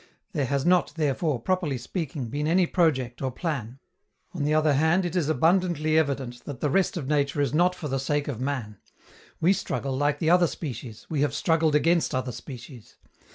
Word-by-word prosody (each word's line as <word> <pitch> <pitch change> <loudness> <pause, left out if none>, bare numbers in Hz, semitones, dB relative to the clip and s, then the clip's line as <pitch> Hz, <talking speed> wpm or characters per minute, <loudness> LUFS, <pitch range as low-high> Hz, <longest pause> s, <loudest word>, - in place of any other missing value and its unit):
There 145 -8 -1
has 140 +1 0
not, 180 0 +3
therefore, 150 -2 0
properly 170 -1 -1
speaking, 135 - -4
been 145 +5 -2
any 180 +3 +4
project 130 -9 0
or 135 - 0
plan. 130 -5 -4 0.6
On 165 -5 -3
the 150 +1 +1
other 155 -1 +3
hand, 160 +6 +3
it 175 0 -3
is 165 -5 +1
abundantly 160 0 +2
evident 135 -6 0
that 140 -4 -6
the 145 - 0
rest 190 +2 +1
of 150 - -4
nature 145 0 +1
is 140 -2 +1
not 180 +3 +3
for 160 - -5
the 135 -1 -1
sake 145 +2 -1
of 130 -5 -4
man: 130 -7 -3 0.6
we 180 +4 +4
struggle 135 -7 -3
like 145 +2 +1
the 160 +2 +1
other 175 -1 +5
species, 125 -8 -7
we 150 -3 0
have 145 -1 +1
struggled 160 -1 +2
against 165 0 +2
other 130 0 -2
species. 125 -2 -11
150 Hz, 195 wpm, -26 LUFS, 130-165 Hz, 0.6 s, other